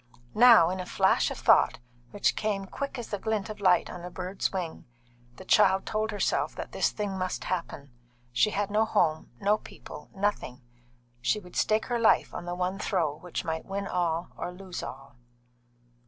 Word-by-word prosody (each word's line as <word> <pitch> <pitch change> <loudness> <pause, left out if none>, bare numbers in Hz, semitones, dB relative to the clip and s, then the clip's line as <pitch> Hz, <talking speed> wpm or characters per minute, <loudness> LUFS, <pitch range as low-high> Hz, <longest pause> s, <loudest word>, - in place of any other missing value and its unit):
Now, 225 -8 +7
in 185 - -3
a 185 - -4
flash - - +2
of - - -6
thought, - - +4 0.3
which 205 - +1
came 205 -2 -1
quick 280 +7 -5
as 240 - -6
the 205 - -3
glint 215 -1 -2
of 210 - -10
light 185 -2 +4
on 175 - -8
a 180 - -6
bird's 185 +2 -3
wing, 180 -4 -5 0.5
the - - -12
child 190 0 +4
told 215 0 -1
herself 205 -3 0
that - - -6
this - - +1
thing 200 -3 -4
must 185 0 -2
happen. 165 -6 -4 0.4
She 120 - +3
had 205 0 -2
no 215 +1 +3
home, 160 -7 +1
no 205 +2 +2
people, 150 - -11
nothing; 195 -11 -2 0.6
she 165 - +1
would 180 -3 -14
stake 215 0 +2
her 240 -1 -1
life 230 - +3
on - - -6
the 175 0 -3
one 185 +2 -2
throw 160 -7 0
which 175 +1 -5
might 160 0 -3
win 200 +1 -3
all 175 -2 -1
or - - -5
lose 185 0 -7
all. 135 -1 -9
190 Hz, 185 wpm, -28 LUFS, 175-210 Hz, 0.6 s, Now